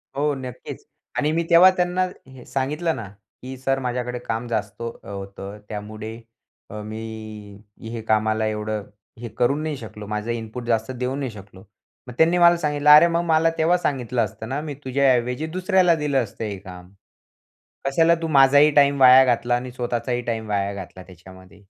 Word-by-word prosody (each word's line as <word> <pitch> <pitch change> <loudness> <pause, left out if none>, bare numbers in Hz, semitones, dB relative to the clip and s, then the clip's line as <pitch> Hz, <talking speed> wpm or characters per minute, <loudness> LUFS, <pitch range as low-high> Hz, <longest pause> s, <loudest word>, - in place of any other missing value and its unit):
हो, 145 +1 +1
नक्कीच 130 -2 -8 0.3
आणि 150 +1 +1
मी 165 +1 0
तेव्हा 175 +2 +8
त्यांना 180 +1 0 0.2
हे 130 -2 -14
सांगितलं 150 +6 -2
ना, 110 -3 -7 0.3
की, 130 +1 -8
"सर 135 +1 -1
माझ्याकडे 125 -1 -3
काम 115 0 -4
जास्त 110 -1 -4
अ, 115 0 -7
होतं 100 +1 -8
त्यामुळे 110 +1 -7 0.5
अ, 105 +1 -7
मी, 110 +1 -7 0.8
हे 115 0 -6
कामाला 110 0 +1
एवढं 105 0 -3 0.4
हे 120 -1 -7
करू 125 +3 +2
नाही 155 -1 -3
शकलो, 105 -3 -9
माझं 105 +2 -3
इनपुट 115 +1 -5
जास्त 115 +1 0
देऊ 130 +1 -3
नाही 135 -4 -4
शकलो." 100 -2 -13 0.4
मग 125 - -8
त्यांनी 170 +2 +4
मला 170 0 +6
सांगितलं, 150 -2 0
"अरे, 150 +3 +9
मग 170 0 0
मला 165 0 +3
तेव्हा 170 +3 +3
सांगितलं 125 -7 -1
असतं 110 +2 -9
ना, 140 +2 -2
मी 150 -2 -5
तुझ्याऐवजी 130 +1 +1
दुसऱ्याला 185 -2 +3
दिलं 145 -4 0
असतं 110 +1 -8
हे 100 -2 -4
काम. 90 -1 -12 0.9
कशाला 165 +5 +3
तू 165 - -2
माझाही 145 +1 +5
टाईम 140 -1 +4
वाया 130 +1 +9
घातला 120 -1 +1
आणि 125 +1 -4
स्वतःचाही 120 0 -2
टाईम 110 -1 -4
वाया 100 -1 -1
घातला 95 -1 -9
त्याच्यामध्ये." 95 +2 -16
125 Hz, 170 wpm, -22 LUFS, 110-145 Hz, 0.9 s, अरे